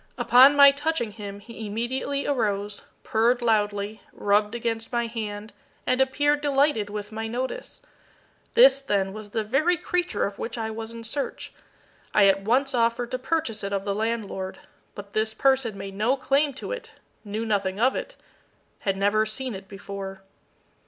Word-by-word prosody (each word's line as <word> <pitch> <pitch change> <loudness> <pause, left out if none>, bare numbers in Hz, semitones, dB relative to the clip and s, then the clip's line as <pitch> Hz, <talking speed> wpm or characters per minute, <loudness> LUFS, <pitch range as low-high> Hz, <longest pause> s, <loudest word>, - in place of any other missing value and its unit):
Upon 265 +4 +7
my 280 -1 +9
touching 290 -5 -1
him 205 -2 -8
he 225 0 -8
immediately 260 +6 -2
arose, 205 -6 -1 0.2
purred 235 +3 +2
loudly, 210 -2 0
rubbed 210 +2 +1
against 225 -1 -2
my 235 -1 0
hand, 215 -2 -5 0.3
and 255 +1 +2
appeared 290 +2 +2
delighted 280 -7 +2
with 210 0 -6
my 220 +1 -4
notice. 255 - -5 0.7
This, 485 - +7
then, 195 -6 0
was 215 0 -9
the 220 +1 -1
very 305 +11 +2
creature 355 0 -1
of 200 0 -6
which 235 - -4
I 220 -1 -3
was 220 0 -6
in 230 0 -8
search. 275 +5 -3 0.6
I 205 - +7
at 195 0 +4
once 260 +7 +1
offered 235 0 +1
to 255 - -2
purchase 255 -7 -1
it 200 - -3
of 195 0 -2
the 200 - 0
landlord; 210 -3 -3 0.4
but 200 -1 -10
this 220 0 0
person 265 -6 +2
made 195 0 -7
no 220 +7 +1
claim 280 +2 +2
to - - -6
it - - -6 0.3
knew 215 +2 -4
nothing 200 -3 -1
of 255 +3 +3
it - - -5 0.6
had 195 -1 -1
never 210 +2 +2
seen 250 +3 -4
it 195 0 -9
before. 195 -1 -7
225 Hz, 165 wpm, -25 LUFS, 205-265 Hz, 0.7 s, my